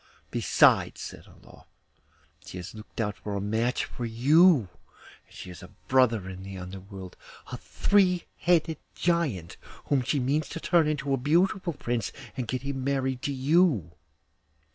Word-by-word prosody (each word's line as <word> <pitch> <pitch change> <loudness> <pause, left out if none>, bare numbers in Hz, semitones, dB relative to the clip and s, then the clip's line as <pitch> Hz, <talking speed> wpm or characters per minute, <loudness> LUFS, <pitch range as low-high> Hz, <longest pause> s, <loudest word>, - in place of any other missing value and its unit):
Besides,' - - +3
said - - -9
Olof, - - -18 0.8
'she - - -9
has 90 +1 -7
looked 110 +1 -12
out 105 -2 -1
a 100 -1 -3
match 110 +5 0
for 125 - -8
you; 135 - +4 0.6
she - - -10
has 90 -1 -10
a 90 - -11 0.2
brother 120 -7 +3
in 95 0 -8
the 95 0 -8
Underworld, 95 0 -9 0.4
a - - -4
three 185 -4 +2 0.2
headed 165 -2 +2 0.2
Giant, 145 - -1 0.3
whom 140 -2 +3
she 140 +4 0
means 140 +4 0
to - - -5
turn 165 -2 +3
into 145 -2 -1
a - - +2
beautiful 175 - +1
prince 120 -5 -3 0.2
and 125 -3 -4
get 130 +3 -3
him 140 -1 -3
married 130 -2 -1
to 145 - -2
you. 135 - +2
130 Hz, 150 wpm, -27 LUFS, 105-155 Hz, 0.8 s, you